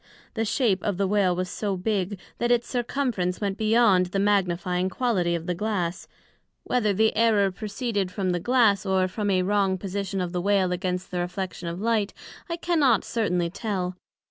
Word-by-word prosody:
the 225 Hz, -, -1 dB
shape 215 Hz, -3 st, +1 dB
of 200 Hz, -4 st, -1 dB
the 195 Hz, 0 st, +1 dB
Whale 190 Hz, -3 st, +2 dB
was 185 Hz, +1 st, -2 dB
so 200 Hz, +1 st, -3 dB
big, 195 Hz, 0 st, -1 dB, 0.2 s
that 240 Hz, -, +1 dB
its 240 Hz, -1 st, +2 dB
Circumference 240 Hz, -7 st, -1 dB
went 200 Hz, -2 st, -1 dB
beyond 215 Hz, -4 st, +4 dB
the 190 Hz, -, -3 dB
magnifying 185 Hz, -2 st, +1 dB
quality 190 Hz, -7 st, 0 dB
of 165 Hz, -1 st, -4 dB
the 180 Hz, -, -1 dB
Glass; 180 Hz, -2 st, -2 dB, 0.6 s
whether 230 Hz, -4 st, +1 dB
the 220 Hz, +3 st, +2 dB
error 215 Hz, -3 st, +3 dB
proceeded 205 Hz, -1 st, -3 dB
from 185 Hz, -2 st, -1 dB
the 175 Hz, -, 0 dB
Glass, 220 Hz, -1 st, +3 dB
or 190 Hz, -2 st, +1 dB
from 205 Hz, +2 st, -2 dB
a 185 Hz, -2 st, +2 dB
wrong 195 Hz, -1 st, +1 dB
position 195 Hz, +1 st, -3 dB
of 180 Hz, -1 st, -2 dB
the 180 Hz, -1 st, -2 dB
Whale 195 Hz, -1 st, +2 dB
against 180 Hz, 0 st, -2 dB
the 180 Hz, -, -2 dB
reflection 180 Hz, 0 st, -4 dB
of 170 Hz, +1 st, -4 dB
light, 215 Hz, -1 st, 0 dB, 0.3 s
I 335 Hz, -, -2 dB
cannot 305 Hz, -, +2 dB
certainly 180 Hz, -7 st, -1 dB
tell. 185 Hz, -3 st, -3 dB
195 Hz, 180 wpm, -25 LUFS, 180-220 Hz, 0.6 s, beyond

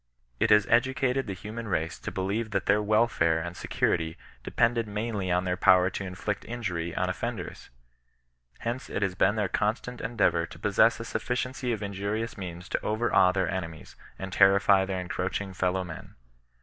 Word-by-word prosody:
It 110 Hz, -, +2 dB
has 105 Hz, -1 st, +6 dB
edu 130 Hz, +3 st, +3 dB
cated 135 Hz, -1 st, 0 dB
the 100 Hz, -, -4 dB
human 110 Hz, +4 st, -7 dB
race 80 Hz, -4 st, -2 dB
to -, -, -5 dB
believe 100 Hz, +4 st, -2 dB
that 100 Hz, -3 st, -1 dB
their 105 Hz, +1 st, +3 dB
welfare 105 Hz, -6 st, +2 dB
and 85 Hz, +1 st, -5 dB
security 80 Hz, -1 st, -1 dB, 0.3 s
depended 115 Hz, -1 st, +1 dB
mainly 105 Hz, -2 st, -3 dB
on 90 Hz, +1 st, +2 dB
their 90 Hz, -1 st, 0 dB
power 90 Hz, -1 st, +5 dB
to 100 Hz, -, -4 dB
inflict 95 Hz, +2 st, -4 dB
in 120 Hz, 0 st, -6 dB
jury 85 Hz, -4 st, -2 dB
on -, -, 0 dB
offenders. -, -, -5 dB, 0.9 s
Hence 120 Hz, +2 st, -3 dB
it 100 Hz, -, -1 dB
has 95 Hz, -2 st, 0 dB
been 95 Hz, +3 st, +2 dB
their 105 Hz, -3 st, 0 dB
constant 120 Hz, +5 st, -2 dB
endeavour 90 Hz, -7 st, +1 dB
to -, -, -12 dB
possess 110 Hz, +3 st, +3 dB
a 115 Hz, -, -5 dB
sufficiency 125 Hz, +2 st, -2 dB
of 110 Hz, -2 st, -2 dB
injurious 100 Hz, +3 st, -3 dB
means 90 Hz, -1 st, -7 dB
to -, -, -1 dB
overawe 110 Hz, -4 st, +3 dB
their 95 Hz, -1 st, 0 dB
enemies, 80 Hz, -5 st, -6 dB, 0.2 s
and 95 Hz, -1 st, -6 dB
temfy 95 Hz, 0 st, +5 dB
their 95 Hz, -1 st, -2 dB
encroaching 95 Hz, +2 st, -3 dB
fellow 95 Hz, 0 st, 0 dB
men. 80 Hz, -5 st, -9 dB
100 Hz, 175 wpm, -28 LUFS, 90-115 Hz, 0.9 s, has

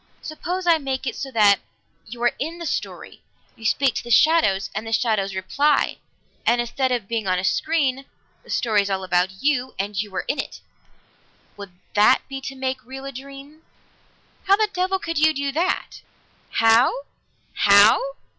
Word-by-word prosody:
Suppose 355 Hz, +4 st, -4 dB
I 335 Hz, -2 st, +4 dB
make 265 Hz, -2 st, -4 dB
it 245 Hz, -, -3 dB
so 275 Hz, -, -5 dB
that 210 Hz, -5 st, +4 dB, 0.5 s
you 235 Hz, +2 st, -8 dB
are 240 Hz, -, +3 dB
in 325 Hz, +4 st, -4 dB
the 340 Hz, -, -7 dB
story, -, -, -5 dB, 0.3 s
you 225 Hz, -, -16 dB
speak 265 Hz, +2 st, +2 dB
to -, -, -4 dB
the 240 Hz, -, -10 dB
shadows, 235 Hz, -8 st, +3 dB
and 215 Hz, +2 st, -5 dB
the -, -, -5 dB
shadows 215 Hz, -4 st, 0 dB
reply, 280 Hz, +11 st, +1 dB, 0.5 s
and 240 Hz, +1 st, +2 dB
instead 240 Hz, +2 st, -1 dB
of 235 Hz, -5 st, -2 dB
being 225 Hz, -2 st, -3 dB
on 185 Hz, 0 st, +1 dB
a 180 Hz, -, -2 dB
screen, 275 Hz, +2 st, 0 dB, 0.4 s
the -, -, -20 dB
story 215 Hz, -3 st, +1 dB
is 200 Hz, -, -4 dB
all 190 Hz, -1 st, -2 dB
about 185 Hz, +3 st, -1 dB
you, 260 Hz, -3 st, 0 dB
and 200 Hz, 0 st, -2 dB
you 210 Hz, -2 st, -8 dB
are -, -, -2 dB
in 290 Hz, -, -2 dB
it. -, -, -5 dB, 1.0 s
Would 200 Hz, -3 st, -10 dB, 0.2 s
that 210 Hz, +5 st, +4 dB
be 270 Hz, 0 st, -6 dB
to 270 Hz, 0 st, -7 dB
make 260 Hz, -1 st, -3 dB
real 265 Hz, +2 st, -9 dB
a 275 Hz, -, -5 dB
dream?" 275 Hz, +3 st, -11 dB, 0.8 s
"How 390 Hz, 0 st, +5 dB
the 425 Hz, 0 st, 0 dB
devil 370 Hz, +1 st, 0 dB
could 330 Hz, -4 st, -3 dB
you 315 Hz, +1 st, +4 dB
do 280 Hz, 0 st, -2 dB
that?" 340 Hz, +6 st, -2 dB, 0.5 s
"How? 230 Hz, +4 st, +4 dB, 0.5 s
How? 200 Hz, +1 st, +6 dB
260 Hz, 180 wpm, -22 LUFS, 210-290 Hz, 1.0 s, How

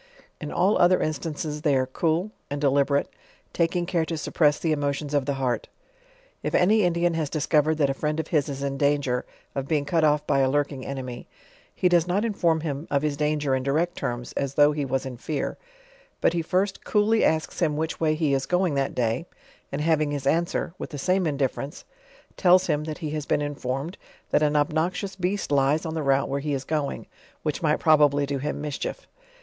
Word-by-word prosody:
In -, -, -6 dB
all 195 Hz, +4 st, +2 dB
other 180 Hz, +1 st, +5 dB
instances 155 Hz, -1 st, -3 dB
they 150 Hz, -3 st, +2 dB
are 130 Hz, -1 st, +2 dB
cool, 165 Hz, +9 st, -1 dB, 0.2 s
and 145 Hz, -, -3 dB
delib 140 Hz, -1 st, +3 dB
erate, 140 Hz, -1 st, +1 dB, 0.5 s
taking 175 Hz, +1 st, +1 dB
care 170 Hz, -2 st, 0 dB
to 165 Hz, 0 st, -3 dB
suppress 150 Hz, -1 st, +2 dB
the 165 Hz, -, -1 dB
emotions 145 Hz, 0 st, -1 dB
of 145 Hz, -2 st, +1 dB
the 140 Hz, -, 0 dB
heart. 130 Hz, -3 st, -1 dB, 0.7 s
If -, -, -2 dB
any 210 Hz, +5 st, +4 dB
Indian 175 Hz, -1 st, +2 dB
has 160 Hz, -3 st, -1 dB
discovered 155 Hz, 0 st, +2 dB
that 145 Hz, -3 st, +2 dB
a -, -, -1 dB
friend 150 Hz, +3 st, -2 dB
of 160 Hz, -, -3 dB
his 150 Hz, -3 st, +1 dB
is 140 Hz, 0 st, -4 dB
in 140 Hz, 0 st, -2 dB
danger 140 Hz, -4 st, +1 dB, 0.3 s
of 135 Hz, -1 st, -3 dB
being 150 Hz, -2 st, 0 dB
cut 160 Hz, +2 st, +1 dB
off 150 Hz, -1 st, +3 dB
by 140 Hz, -, +2 dB
a 135 Hz, -1 st, +3 dB
lurking 140 Hz, -1 st, -1 dB
enemy, 130 Hz, -3 st, -6 dB, 0.5 s
he 180 Hz, -, +2 dB
does 175 Hz, -1 st, +3 dB
not 195 Hz, +5 st, +1 dB
inform 170 Hz, -7 st, +1 dB
him 150 Hz, 0 st, -4 dB
of 140 Hz, 0 st, +1 dB
his 150 Hz, -2 st, 0 dB
danger 150 Hz, -1 st, 0 dB
in 130 Hz, -, +1 dB
direct 155 Hz, +6 st, 0 dB
terms, 120 Hz, 0 st, -4 dB
as 140 Hz, -1 st, -2 dB
though 145 Hz, 0 st, +6 dB
he 145 Hz, -1 st, -2 dB
was 135 Hz, 0 st, -1 dB
in 130 Hz, -2 st, -6 dB
fear, 150 Hz, +4 st, -3 dB, 0.6 s
but -, -, +2 dB
he 170 Hz, -, 0 dB
first 190 Hz, +4 st, -1 dB
cooly 215 Hz, +1 st, +2 dB
asks 160 Hz, 0 st, 0 dB
him 155 Hz, -4 st, +1 dB
which 160 Hz, +1 st, -2 dB
way 155 Hz, -1 st, +2 dB
he 155 Hz, -3 st, +1 dB
is 135 Hz, 0 st, 0 dB
going 180 Hz, -2 st, +1 dB
that 135 Hz, -1 st, -1 dB
day; 120 Hz, +6 st, -1 dB, 0.4 s
and 140 Hz, -, -2 dB
having 155 Hz, -1 st, +2 dB
his 145 Hz, -2 st, -3 dB
answer; 165 Hz, +2 st, 0 dB
with -, -, -5 dB
the 145 Hz, -, -7 dB
same 185 Hz, +4 st, +1 dB
indifference 140 Hz, -1 st, -2 dB, 0.5 s
tells 185 Hz, 0 st, +5 dB
him, 150 Hz, +1 st, 0 dB
that 155 Hz, -1 st, -5 dB
he 155 Hz, -4 st, -4 dB
has 150 Hz, -1 st, -4 dB
been 145 Hz, -, +1 dB
informed, 145 Hz, +3 st, -4 dB, 0.3 s
that 150 Hz, -, +3 dB
an 150 Hz, 0 st, +2 dB
obnoxious 160 Hz, +6 st, 0 dB
beast 190 Hz, -1 st, -2 dB
lies 140 Hz, +3 st, +2 dB
on 160 Hz, -, -3 dB
the 160 Hz, -, -2 dB
route 135 Hz, -1 st, +2 dB
where 140 Hz, +1 st, -2 dB
he 145 Hz, 0 st, -1 dB
is 135 Hz, -, -4 dB
going, 150 Hz, -1 st, -2 dB, 0.4 s
which 150 Hz, -2 st, -2 dB
might 155 Hz, -2 st, +2 dB
probably 145 Hz, -2 st, +4 dB
do 140 Hz, -1 st, -2 dB
him 150 Hz, +2 st, -3 dB
mischief. 150 Hz, -, -4 dB
150 Hz, 210 wpm, -25 LUFS, 140-165 Hz, 0.7 s, though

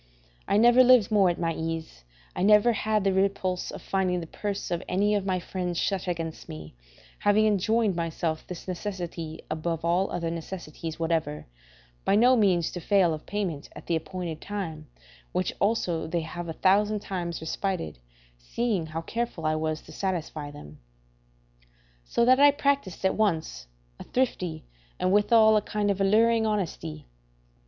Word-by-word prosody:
I 200 Hz, -, +2 dB
never 240 Hz, +3 st, +7 dB
lived 245 Hz, -5 st, +5 dB
more 200 Hz, -4 st, +5 dB
at 175 Hz, -, -1 dB
my 165 Hz, -1 st, -1 dB
ease; 160 Hz, -, -5 dB, 0.3 s
I -, -, -3 dB
never 210 Hz, +4 st, +5 dB
had 215 Hz, -1 st, 0 dB
the 195 Hz, -1 st, +2 dB
repulse 190 Hz, -1 st, 0 dB
of -, -, -8 dB
finding 185 Hz, -2 st, 0 dB
the 170 Hz, -, -6 dB
purse 200 Hz, +3 st, -4 dB
of 170 Hz, 0 st, -1 dB
any 205 Hz, +3 st, +2 dB
of 200 Hz, -2 st, 0 dB
my 185 Hz, -1 st, +1 dB
friends 180 Hz, -1 st, -4 dB
shut 190 Hz, 0 st, -1 dB
against 165 Hz, -2 st, -4 dB
me, 75 Hz, 0 st, -8 dB, 0.5 s
having 205 Hz, +1 st, +3 dB
enjoined 215 Hz, 0 st, +2 dB
myself 165 Hz, -1 st, -2 dB
this 180 Hz, +1 st, -8 dB
necessity 175 Hz, -4 st, -5 dB
above 165 Hz, +1 st, -2 dB
all 180 Hz, +3 st, +2 dB
other 170 Hz, -1 st, -2 dB
necessities 165 Hz, -1 st, -6 dB
whatever, 160 Hz, -3 st, -1 dB, 0.6 s
by -, -, +3 dB
no 245 Hz, +4 st, +6 dB
means 185 Hz, -7 st, +2 dB
to 175 Hz, -, -5 dB
fail 180 Hz, -1 st, +3 dB
of 155 Hz, -, -8 dB
payment 185 Hz, -8 st, -3 dB
at -, -, -10 dB
the 170 Hz, -, 0 dB
appointed 165 Hz, 0 st, -4 dB
time, 165 Hz, -7 st, -5 dB, 0.5 s
which 180 Hz, 0 st, 0 dB
also 180 Hz, -7 st, 0 dB
they 170 Hz, +1 st, -1 dB
have 170 Hz, +1 st, -6 dB
a -, -, -3 dB
thousand 205 Hz, +4 st, +2 dB
times 175 Hz, -4 st, -4 dB
respited, 160 Hz, -, -3 dB, 0.4 s
seeing 195 Hz, -, -1 dB
how 160 Hz, +1 st, -4 dB
careful 230 Hz, -3 st, -4 dB
I 155 Hz, -, +2 dB
was 155 Hz, 0 st, -2 dB
to -, -, -14 dB
satisfy 165 Hz, -6 st, -3 dB
them; 75 Hz, -, -12 dB, 1.3 s
so 235 Hz, -, +1 dB
that 255 Hz, +2 st, +5 dB
I 290 Hz, 0 st, +8 dB
practised 280 Hz, -, 0 dB
at 190 Hz, -, +3 dB
once 170 Hz, -, -1 dB, 0.3 s
a -, -, -7 dB
thrifty, 180 Hz, -, -2 dB, 0.3 s
and 185 Hz, -, +1 dB
withal 220 Hz, +1 st, +5 dB
a -, -, +2 dB
kind 205 Hz, 0 st, -1 dB
of 195 Hz, 0 st, -2 dB
alluring, 220 Hz, +3 st, +4 dB
honesty. 170 Hz, -, -3 dB
185 Hz, 165 wpm, -27 LUFS, 165-210 Hz, 1.3 s, I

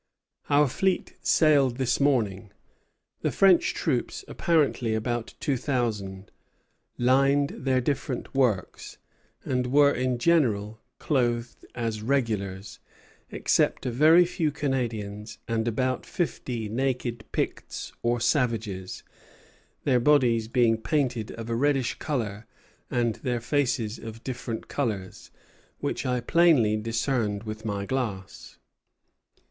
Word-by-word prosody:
Our 145 Hz, 0 st, +5 dB
fleet 190 Hz, +8 st, -1 dB
sailed 140 Hz, -6 st, +3 dB
this 130 Hz, -2 st, 0 dB
morning. 110 Hz, -8 st, +1 dB, 0.7 s
The -, -, 0 dB
French 190 Hz, -3 st, +4 dB
troops, 125 Hz, -, -2 dB
apparently 140 Hz, -9 st, +1 dB
about 120 Hz, +1 st, -3 dB
two 140 Hz, -3 st, 0 dB
thousand, 110 Hz, -8 st, -2 dB, 0.7 s
lined 135 Hz, +3 st, +3 dB
their 130 Hz, -1 st, 0 dB
different 130 Hz, -1 st, -3 dB
works, 125 Hz, -9 st, -1 dB, 0.5 s
and 125 Hz, -1 st, 0 dB
were 140 Hz, +2 st, +5 dB
in 125 Hz, 0 st, 0 dB
general 115 Hz, -8 st, +1 dB, 0.2 s
clothed 120 Hz, -4 st, -1 dB
as 115 Hz, -3 st, -2 dB
regulars, 105 Hz, -6 st, -2 dB, 0.5 s
except -, -, +1 dB
a 125 Hz, -, -1 dB
very 160 Hz, +8 st, +6 dB
few 170 Hz, -2 st, -1 dB
Canadians 110 Hz, -7 st, -3 dB
and 115 Hz, 0 st, -1 dB
about 130 Hz, +3 st, 0 dB
fifty 125 Hz, -9 st, -3 dB
naked 120 Hz, -1 st, -2 dB
Picts -, -, -3 dB
or 120 Hz, +1 st, +1 dB
savages, 115 Hz, -7 st, -1 dB, 0.8 s
their 130 Hz, -3 st, +3 dB
bodies 120 Hz, -5 st, +3 dB
being 115 Hz, -1 st, +2 dB
painted 125 Hz, -5 st, -1 dB
of 115 Hz, 0 st, -7 dB
a 115 Hz, -, -1 dB
reddish 135 Hz, 0 st, +1 dB
color 110 Hz, -8 st, -3 dB, 0.4 s
and 120 Hz, -2 st, 0 dB
their 125 Hz, -2 st, -2 dB
faces 120 Hz, -3 st, -1 dB
of 115 Hz, 0 st, -9 dB
different 120 Hz, -3 st, -5 dB
colors, 105 Hz, -9 st, -4 dB, 0.5 s
which -, -, -3 dB
I 125 Hz, -1 st, 0 dB
plainly 150 Hz, -10 st, +4 dB
discerned 115 Hz, -1 st, -1 dB
with 110 Hz, 0 st, -7 dB
my 100 Hz, -2 st, -2 dB
glass. 110 Hz, -7 st, -4 dB
120 Hz, 115 wpm, -26 LUFS, 110-135 Hz, 0.8 s, very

